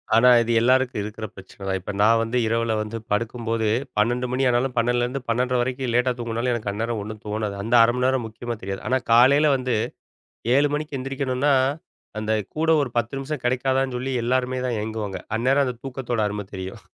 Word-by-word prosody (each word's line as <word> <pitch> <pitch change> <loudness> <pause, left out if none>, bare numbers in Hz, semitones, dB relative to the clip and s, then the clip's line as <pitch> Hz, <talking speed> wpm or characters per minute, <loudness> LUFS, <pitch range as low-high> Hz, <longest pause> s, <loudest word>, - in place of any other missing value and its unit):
ஆனா 125 +3 +6
இது 115 0 -1
எல்லாருக்கும் 130 -2 +2
இருக்கிற 110 +1 -6
பிரச்சனை 95 +1 -14
தான். 95 - 0
இப்ப 100 - -5
நான் 115 +2 +5
வந்து 115 +2 -1
இரவில 115 0 0
வந்து 105 +2 -5
படுக்கும்போது, 115 0 -1 0.3
12 120 +4 +1
மணி 130 +1 0
ஆனாலும் 125 +1 0
12 120 +1 +2
லிருந்து 125 +3 -2
12:30 125 +2 +1
வரைக்கும் 130 -1 -2
லேட்டா 125 +1 +3
தூங்குனாலும், 115 +1 -1
எனக்கு 110 -3 -2
அந்நேரம் 115 +1 -2
ஒண்ணும் 110 0 -8
தோணாது. 105 -1 -2
அந்த 115 +3 +1
1/2 120 +1 +3
மணி 125 - +1
நேரம் 130 -3 0
முக்கியமா 115 +1 -6
தெரியாது. 95 0 -5
ஆனா 130 +1 +2
காலையில 140 +5 +6
வந்து, 125 -2 -1 0.8
7 145 +1 +4
மணிக்கு 150 -1 -4
எந்திரிக்கணும்ன்னா, 135 +1 0 0.7
அந்த 110 0 -2 0.2
கூட 160 +1 0
ஒரு 130 - -4
10 120 +2 -1
நிமிஷம் 135 -1 -5
கிடைக்காதான்னு 130 +1 +1
சொல்லி 130 +2 -3
எல்லாருமே 130 +1 0
தான் 120 - -1
ஏங்குவாங்க. 105 -3 -4 0.2
அந்நேரம் 135 +4 +3
அந்த 125 -1 -3
தூக்கத்தோட 125 -3 -3
அரும 105 0 -4
தெரியும். 95 0 -6
120 Hz, 185 wpm, -23 LUFS, 110-130 Hz, 0.8 s, ஆனா